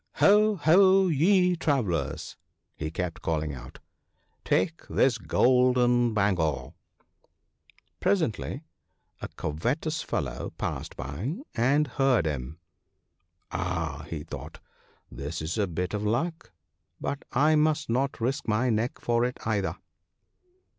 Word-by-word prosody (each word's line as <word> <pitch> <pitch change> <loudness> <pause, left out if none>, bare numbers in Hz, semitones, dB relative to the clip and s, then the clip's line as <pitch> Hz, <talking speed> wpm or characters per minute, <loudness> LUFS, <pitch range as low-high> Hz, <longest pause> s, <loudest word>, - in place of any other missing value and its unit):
" - - -52
Ho! 210 +1 +5
ho! 190 +2 +5
ye 180 +4 +4
travellers," 90 - -1 0.4
he 80 - -4
kept 85 +1 -4
calling 80 -2 -1
out, 65 -1 -10 0.4
" - - -44
take 165 -2 +1
this 125 -4 +2
golden 125 +2 +3
bangle! 90 - 0 0.7
" - - -35
Presently 155 - 0 0.6
a - - -4
covetous 135 - -2
fellow - - -3
passed - - -4
by 75 - -4 0.2
and 135 +6 +3
heard 125 - +2
him. 75 0 -3 0.5
" - - -48
Ah! 80 -4 -3
" 75 -3 -5
thought - - -8
he, - - -23
" - - -12
this 75 +5 -4
is 80 +2 -3
a 100 - +2
bit 90 +2 -3
of 105 - -1
luck 130 +11 -2 0.2
— - - -51
but 140 0 -3
I 150 +5 +4
must 150 -1 +2
not 135 +4 0
risk 130 +4 -1
my 115 +3 +2
neck 110 +2 -1
for 120 0 +1
it 125 +1 -1
either. 105 -3 0
120 Hz, 135 wpm, -27 LUFS, -, 0.7 s, Ho